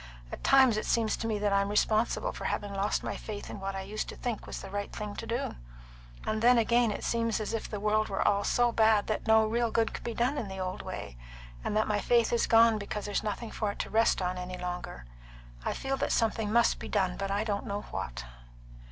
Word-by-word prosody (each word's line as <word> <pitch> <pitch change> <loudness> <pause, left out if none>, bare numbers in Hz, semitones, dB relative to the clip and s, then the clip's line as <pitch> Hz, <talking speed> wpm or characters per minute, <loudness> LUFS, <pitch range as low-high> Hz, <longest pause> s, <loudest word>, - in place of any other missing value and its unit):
At - - -7
times 265 -5 +6
it 215 - -2
seems 225 -2 +2
to 225 - -3
me 220 -2 0
that 205 -1 0
I'm 200 0 +2
responsible 220 - +1
for - - -7
having 205 -1 -2
lost 200 +1 0
my - - -3
faith 210 -2 -7
in - - -7
what 195 0 -4
I 195 - -3
used 205 +3 -4
to - - -7
think 240 -4 -4
was - - -5
the 195 - -9
right 205 0 -3
thing 210 -1 -5
to 230 - -5
do; 235 +4 -2 0.7
and 215 0 -1
then 245 +1 +6
again 235 +1 +3
it 205 - -4
seems 230 -1 0
as 215 +1 -3
if 225 - -3
the 210 - -4
world 215 +1 +1
were 195 - 0
all 205 0 +3
so 240 +2 +2
bad 220 -2 +4
that 215 +1 -3
no 220 0 +6
real 235 +2 +1
good 225 0 +1
could - - -6
be 235 -1 -4
done 255 +5 +1
in 215 - -4
the 190 0 -7
old 185 0 -3
way, - - -7 0.5
and 210 - -1
that 215 - +2
my 210 -1 +1
faith 235 +2 +2
is 235 - +2
gone 225 -1 +5
because 205 0 -4
there's 205 -1 -1
nothing 215 +2 -4
for 210 -2 -2
it - - -15
to - - -4
rest 225 -3 +3
on 180 0 -2
any 180 0 -5
longer. 180 - -5 0.6
I - - -1
feel 270 0 -2
that - - -1
something 225 -2 +1
must 235 +1 +3
be - - -7
done; 190 -3 +1
but 195 0 -3
I 200 +2 0
don't 205 -2 -2
know 200 +1 -2
what." - - -4
215 Hz, 245 wpm, -30 LUFS, 200-230 Hz, 0.7 s, times